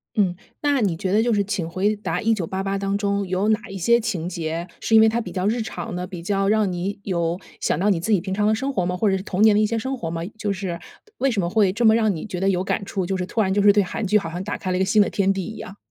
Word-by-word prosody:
嗯， 190 -4 +2 0.3
那 285 -3 +2
你 195 -6 +1
觉 185 +2 -2
得 210 +3 +4
就 240 +1 +1
是 205 - +2
《请 190 -5 -2
回 195 +5 0
答 180 -4 -3
1988》 220 -4 +1 0.3
当 195 0 -1
中 200 -1 -1
有 185 +3 0
哪 215 0 +3
一 195 - -6
些 235 +6 +3
情 195 -8 -3
节， 170 -1 -4
是 225 - +1
因 220 - +8
为 220 - +6
它 230 +2 +1
比 - - -7
较 185 -1 -2
日 225 +3 +1
常 180 -6 -5
呢？ 180 0 -4
比 180 -2 -7
较 195 +1 0
让 210 -2 +2
你 185 +4 -3
有 170 -2 -1 0.2
想 - - 0
到 200 +3 +2
你 180 - +1
自 185 +7 -2
己 205 - +4
平 190 +2 -4
常 205 +1 +1
的 215 - +3
生 270 +5 -2
活 185 - 0
吗？ 180 +1 -2
或 210 +2 +2
者 190 - +2
是 - - -5
童 195 -1 -2
年 215 -1 +6
的 210 - +4
一 - - +4
些 230 +2 -1
生 260 +4 -2
活 230 - -4
吗？ 165 0 -4
就 210 -1 -2
是 185 -3 -4 0.4
为 275 - +2
什 225 -5 -1
么 175 - 0
会 200 -1 +3
这 230 +5 0
么 220 - +7
让 220 -4 +2
你 160 - -6
觉 185 -4 -5
得 195 +2 +2
有 185 -1 +1
感 200 - -1
触？ 195 -2 -2
就 190 +2 -2
是 180 - -2
突 225 - 0
然 190 -2 +1
就 205 - +2
是 205 0 +7
对 205 0 +3
韩 190 +4 -4
剧 210 +3 +4
好 195 -5 -3
像 175 +2 -4
打 205 - -4
开 185 - -3
了 180 - 0
一 - - -1
个 190 - +2
新 210 +2 +4
的 - - -2
天 195 -1 +1
地 190 -2 -2
一 220 - -7
样。 195 - -9
195 Hz, 345 characters per minute, -23 LUFS, 180-215 Hz, 0.4 s, 因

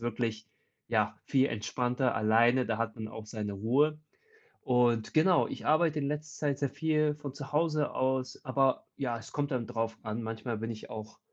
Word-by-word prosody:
wirklich 115 -2 -2 0.4
ja, - - +1
viel 135 0 +3
entspannter 125 +4 0
alleine. 115 +4 +4
Da 115 - 0
hat 115 -1 -1
man 110 -1 -5
auch 110 0 -8
seine 105 -2 -4
Ruhe. 135 +10 +2 0.6
Und 120 -3 +2
genau, 170 +3 +4
ich - - -7
arbeite 155 0 +3
in 140 - -1
letzter 150 +1 -3
Zeit 140 -1 0
sehr 140 - +1
viel 155 +1 +1
von 145 -3 -7
zu 140 -1 -8
Hause 155 -1 +2
aus, 130 0 0
aber, 135 0 +2
ja, 120 -4 -1
es 115 - -11
kommt 145 -1 -1
dann 120 -4 -1
drauf 115 0 -2
an. 110 +1 -3
Manchmal 115 +1 -3
bin 115 +1 -3
ich 110 - -9
auch 110 0 -8
125 Hz, 185 wpm, -31 LUFS, 115-145 Hz, 0.6 s, alleine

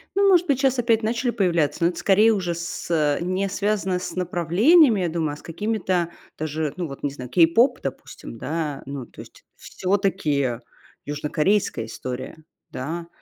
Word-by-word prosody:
Ну, 395 0 +4
может 360 -1 +4
быть, 270 -3 +1
щас 265 -2 +2
опять 230 -2 +2
начали 235 +3 0
появляться, 170 -9 +1
но 170 - +5
это, 175 - -7
скорее, 205 +5 +4
уже 180 -5 -1
с 170 0 -6 0.3
э, - - -8
не 185 +3 -1
связано 195 -2 -1
с - - -6
направлениями, 190 - +4
я 175 - 0
думаю, 160 -2 -2
а - - -6
с - - -14
какими-то 185 -1 -1 0.3
даже, 155 -1 -3
ну, 175 -2 -2
вот 135 -2 -10
не 145 - +1
знаю, 125 -3 -8
кей-поп, 205 - +4
допустим, 130 -3 -7
да, 150 +1 -3
ну, 140 -2 -6
то - - -18
есть - - -16
всё-таки 155 - -1 0.5
южнокорейская 150 - 0
история. 125 +4 -6 0.3
Да, 165 +6 -5
175 Hz, 170 wpm, -23 LUFS, 150-215 Hz, 0.5 s, но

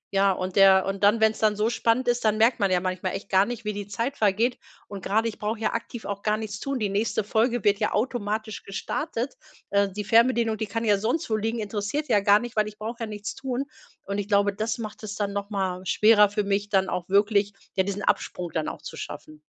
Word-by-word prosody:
ja, 195 0 +4
und 185 0 -3
der 190 -1 +7
und 195 +1 -3
dann, 210 +3 +5
wenn’s 220 0 +3
dann 215 -1 +2
so 215 +3 +1
spannend 240 +1 +1
ist, 240 0 +1
dann 215 -1 +2
merkt 230 +3 +3
man 200 - +2
ja 180 -1 +3
manchmal 185 0 -3
echt 195 - -7
gar 190 +1 +4
nicht, 240 -2 -6
wie 210 - -1
die 205 0 -6
Zeit 230 +7 -3
vergeht. 220 +2 +1 0.3
Und 200 -2 -8
gerade, 220 +3 +1
ich 225 - -6
brauche 215 +1 -2
ja 220 - -1
aktiv 230 0 -5
auch 200 0 -4
gar 215 0 +1
nichts 215 -1 -5
tun. 275 +2 -3
Die 215 -4 -1
nächste 215 +2 0
Folge 230 +2 +1
wird 205 -1 +3
ja 210 - 0
automatisch 215 -1 -2
gestartet. 250 +5 -4 0.4
Äh, 200 0 +3
die 210 +2 -5
Fernbedienung, 230 +1 +3
die 220 - -2
kann 225 +3 -3
ja 205 -2 +3
sonst 240 +9 -1
wo - - +3
liegen, 225 +2 -1
interessiert 215 +7 -3
ja 210 - +4
gar 200 +1 +5
nicht, 240 +2 -6
weil 215 -1 +2
ich 210 0 -9
brauche 225 +3 -5
ja 230 - -2
nichts 210 0 -5
tun. 265 0 -3 0.4
Und 200 +1 -3
ich 200 - -3
glaube, 200 -1 +3
das 220 +3 -2
macht 215 -3 -7
es 210 -2 -6
dann 200 -1 -2
noch 200 +1 -4
mal 190 -3 -2
schwerer 210 -1 +5
für 205 +1 -1
mich, 200 +1 -1
dann 190 -2 +2
auch 175 0 -4
wirklich, 200 0 +3 0.2
ja, 190 - +3
diesen 200 +1 -4
Absprung 175 -3 -1
dann 160 -1 -1
auch - - -9
zu - - -8
schaffen. 155 0 -8
210 Hz, 245 wpm, -25 LUFS, 200-225 Hz, 0.4 s, der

